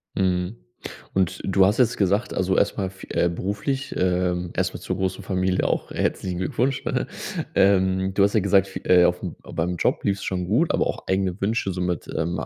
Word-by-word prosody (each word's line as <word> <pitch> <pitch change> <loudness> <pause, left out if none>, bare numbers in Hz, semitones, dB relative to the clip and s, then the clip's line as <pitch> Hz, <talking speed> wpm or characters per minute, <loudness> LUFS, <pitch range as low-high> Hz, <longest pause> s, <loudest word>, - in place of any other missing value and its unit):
Mhm. 90 +2 0 0.6
Und 95 -3 0
du 95 0 +4
hast 100 +3 +2
jetzt 125 -2 +3
gesagt 100 +3 +1
also 95 0 +1
erstmal 100 -1 +1
f 95 0 -12
äh, 85 - +2
beruflich 105 +10 -3
ähm, 90 -1 0
erstmal 90 0 -1
zur 90 - -3
großen 95 0 -2
Familie 95 -1 0
auch - - -1
herzlichen 90 -2 -2
Glückwunsch, 125 +8 -1
ne? - - 0 0.5
Ähm, 95 -1 +3
du 100 - +4
hast 100 - +3
ja 110 - +4
gesagt 100 -1 +3
f - - -2
äh, 90 -1 +6
aufm 90 0 -1
beim 90 +2 -2
Job - - 0
lief's 100 -1 0
schon 90 -1 -2
gut, 120 - +2
aber - - +2
auch - - -5
eigene 95 0 0
Wünsche 100 0 0
so 90 0 -4
mit, 90 -2 -2
ähm, 85 +2 -1
95 Hz, 195 wpm, -24 LUFS, 90-100 Hz, 0.6 s, äh